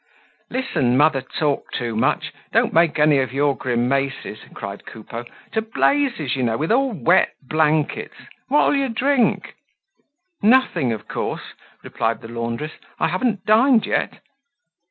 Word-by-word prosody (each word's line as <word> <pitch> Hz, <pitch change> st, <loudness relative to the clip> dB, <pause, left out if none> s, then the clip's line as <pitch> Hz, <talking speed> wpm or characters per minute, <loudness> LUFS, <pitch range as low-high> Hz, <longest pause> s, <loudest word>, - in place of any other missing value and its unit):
"Listen, 155 Hz, -, 0 dB
mother 145 Hz, -1 st, +4 dB
Talk 145 Hz, +2 st, -2 dB
too 120 Hz, -2 st, -3 dB
much, 110 Hz, -, 0 dB, 0.2 s
don't -, -, +2 dB
make 165 Hz, -1 st, +3 dB
any 150 Hz, -2 st, +4 dB
of 130 Hz, -1 st, -1 dB
your 140 Hz, +1 st, +1 dB
grimaces!" 130 Hz, -1 st, -1 dB
cried 100 Hz, 0 st, -7 dB
Coupeau. 115 Hz, +2 st, -8 dB, 0.3 s
"To 220 Hz, -, 0 dB
blazes, 225 Hz, -, 0 dB
you 130 Hz, -, -2 dB
know, 115 Hz, -2 st, 0 dB
with 155 Hz, +5 st, -1 dB
all 265 Hz, +2 st, +2 dB
wet 180 Hz, -, +3 dB
blankets! 155 Hz, 0 st, 0 dB, 0.3 s
What'll 290 Hz, +2 st, +3 dB
you 275 Hz, -1 st, 0 dB
drink?" 250 Hz, +2 st, +1 dB, 0.9 s
"Nothing, 220 Hz, -, +3 dB
of 110 Hz, -, -5 dB
course," -, -, -4 dB, 0.3 s
replied 115 Hz, 0 st, -2 dB
the 115 Hz, -, -10 dB
laundress. 115 Hz, +6 st, -4 dB, 0.3 s
"I -, -, +2 dB
haven't 200 Hz, +2 st, -1 dB
dined 225 Hz, +2 st, +4 dB
yet." -, -, -1 dB
150 Hz, 135 wpm, -21 LUFS, -, 0.9 s, mother